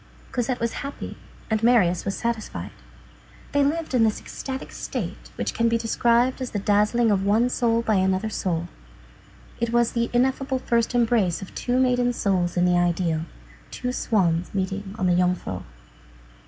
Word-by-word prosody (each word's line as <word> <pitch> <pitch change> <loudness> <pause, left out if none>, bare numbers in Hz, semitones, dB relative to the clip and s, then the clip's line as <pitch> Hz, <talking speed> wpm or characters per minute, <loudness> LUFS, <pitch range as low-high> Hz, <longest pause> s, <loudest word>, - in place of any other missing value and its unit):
Cosette 245 0 -1
was 235 0 -1
happy, 280 0 -6 0.4
and 220 -1 +1
Marius 215 -8 +3
was 195 - -2
satisfied. 235 -2 -3 0.8
They 285 0 +3
lived 315 +1 -1
in 245 -3 +4
this 220 -1 +1
ecstatic 265 0 -6
state - - -5
which - - -2
can 230 0 +2
be 230 - +2
described 235 +3 +2
as 255 - -3
the - - -3
dazzling 210 +3 +2
of 195 -1 +2
one 220 +5 +3
soul 230 -2 +1
by 220 -3 +2
another 190 +2 +1
soul. 170 -4 -2 0.9
It 235 0 -1
was 240 -1 +3
the 235 0 0
ineffable 265 +2 +1
first 235 -1 0
embrace 225 -7 +2
of 190 - -11
two 250 +1 0
maiden 245 -1 +2
souls 185 -6 0
in 175 - +4
the 180 0 +3
ideal. 170 -2 0 0.4
Two 250 - -3
swans 180 -8 0
meeting 195 +1 -3
on 185 - -1
the 180 -1 +3
Jungfrau. 180 - 0
225 Hz, 165 wpm, -24 LUFS, 190-245 Hz, 0.9 s, in